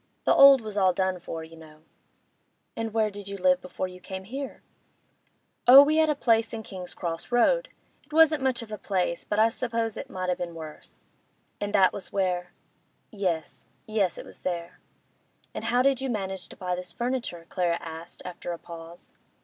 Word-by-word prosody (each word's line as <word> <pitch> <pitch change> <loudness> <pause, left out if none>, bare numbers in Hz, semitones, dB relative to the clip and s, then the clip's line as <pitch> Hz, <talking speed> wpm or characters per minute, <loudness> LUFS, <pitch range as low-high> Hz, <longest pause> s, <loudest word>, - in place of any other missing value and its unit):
The - - +5
old 275 -2 +9
was 215 -2 -6
all 185 -2 +4
done 185 0 0
for, 165 -1 -6
you 160 +1 -12
know.' 155 -1 -15 0.9
'And 225 -1 -3
where 215 -1 +1
did 200 0 -8
you 200 0 -5
live 275 +3 +3
before 185 0 -4
you 180 0 -11
came 190 +1 -7
here?' 265 +7 -7 1.0
'Oh, 270 +3 +11
we 305 +2 +2
had 315 -1 +4
a 300 - +2
place 230 -4 +2
in 225 -1 -5
King's 185 -3 -8
Cross 170 +4 -5
Road—it 405 - 0
wasn't 310 -1 +5
much 260 -3 0
of 220 - -12
a 215 - -5
place, 180 -3 -1
but 210 - -2
I 220 +1 +5
suppose 230 -2 -2
it - - -7
might 185 -1 -2
a' - - +1
been 170 -1 -5
worse.' 155 -2 -10 0.5
'And 205 0 -3
that 190 -2 +5
was 195 - -7
where—?' 180 -2 0 0.6
'Yes—yes—it 195 +1 -3
was - - -13
there.' 170 -2 -4 0.7
'And 220 - -5
how 245 +2 +3
did 270 -1 +3
you 265 - -2
manage 190 -5 -4
to - - -12
buy 180 -1 -2
this 180 -1 -6
furniture?' 240 -9 -3
Clara 175 -2 0
asked, 165 0 -9
after 175 -1 -5
a - - -5
pause. 170 +1 -11
195 Hz, 185 wpm, -27 LUFS, 175-235 Hz, 1.0 s, Oh